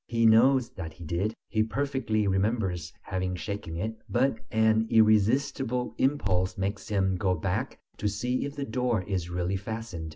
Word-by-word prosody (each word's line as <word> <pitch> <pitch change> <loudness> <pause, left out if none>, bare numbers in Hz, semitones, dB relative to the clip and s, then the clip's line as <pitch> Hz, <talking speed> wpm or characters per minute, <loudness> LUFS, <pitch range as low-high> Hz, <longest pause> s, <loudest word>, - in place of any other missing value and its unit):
He 115 0 +1
knows 120 +3 +5
that 80 -5 -7
he 85 - -12
did, 90 +7 -1
he 110 - +1
perfectly 115 -3 0
remembers 95 -4 0
having 95 -1 -2
shaken 90 -3 -5
it, 110 +5 -3
but 125 -1 +1
an 110 0 +3
irresistible 115 +3 +3
impulse 95 -10 +1
makes 100 +1 -3
him 95 -2 +1
go 90 0 +1
back 80 - -2 0.2
to 105 - -1
see 120 +5 -1
if 140 0 -6
the 140 - -3
door 120 -3 0
is 90 -3 -3
really 90 +2 -1
fastened. 100 -5 -5
110 Hz, 160 wpm, -28 LUFS, 95-115 Hz, 0.2 s, knows